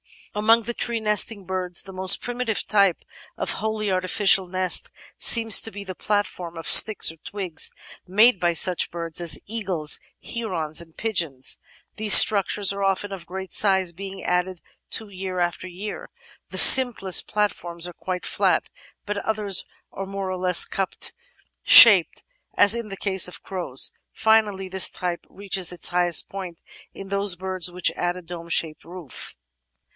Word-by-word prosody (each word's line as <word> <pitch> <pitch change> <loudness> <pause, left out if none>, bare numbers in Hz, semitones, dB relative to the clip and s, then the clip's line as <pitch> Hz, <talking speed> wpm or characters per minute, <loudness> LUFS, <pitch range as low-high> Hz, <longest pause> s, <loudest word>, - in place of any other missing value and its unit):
Among 225 +2 +2
the 240 +2 -5
tree 235 -1 -3
nesting 210 -1 -1
birds 180 -1 -5
the 195 - -13
most 185 +1 +4
primitive 245 -3 -4
type 200 -3 +1 0.3
of - - -2
wholly 215 -2 -3
artificial 185 +1 +2
nest 185 0 0 0.3
seems 225 -2 +5
to - - -1
be 205 -1 -9
the 190 -1 -8
platform 185 -4 -4
of 165 - -8
sticks 215 -2 +6
or 165 - -18
twigs 180 -1 -3 0.4
made 210 +3 +3
by 175 -1 0
such 180 +2 +3
birds 165 -1 -6
as 165 -4 +2
eagles, 190 -9 -2 0.2
herons, 170 -9 -4
and 165 -1 -15
pigeons. 165 - -1 0.4
These 215 -1 +8
struc 200 -3 +7
tures 200 -1 0
are 200 0 -5
often 195 +1 -2
of 180 -4 -9
great 190 +1 -8
size, 190 -3 +1
being 195 +2 -10
added 180 0 -3 0.3
to 220 -2 -2
year 185 -1 -7
after 175 +1 -3
year. 190 +4 -9 0.4
The - - -9
simplest 245 -8 +6
platforms 175 -5 -3
are 175 - -7
quite 180 0 -7
flat, - - -1 0.3
but 205 0 -5
others 210 -3 -1 0.3
are 195 - -7
more 195 -1 -6
or 185 - -5
less 180 -1 +2
cup 195 -1 -5 0.7
shaped, - - +6 0.3
as 205 - +5
in 235 -2 -4
the 195 -1 -9
case 190 -2 +1
of 180 - -11
crows. 175 -9 -3 0.2
Finally, 215 -4 0
this 190 0 +3
type 175 -1 -6
reaches 195 -3 -4
its 175 - -4
highest 175 -1 +1
point 185 -4 -9 0.3
in 195 0 -11
those 200 -1 -2
birds 185 -1 -4
which 180 0 0
add 175 0 -4
a - - -10
dome 170 -1 -11
shaped 160 -2 -1
roof. 170 -6 -10
190 Hz, 160 wpm, -22 LUFS, 175-205 Hz, 0.7 s, These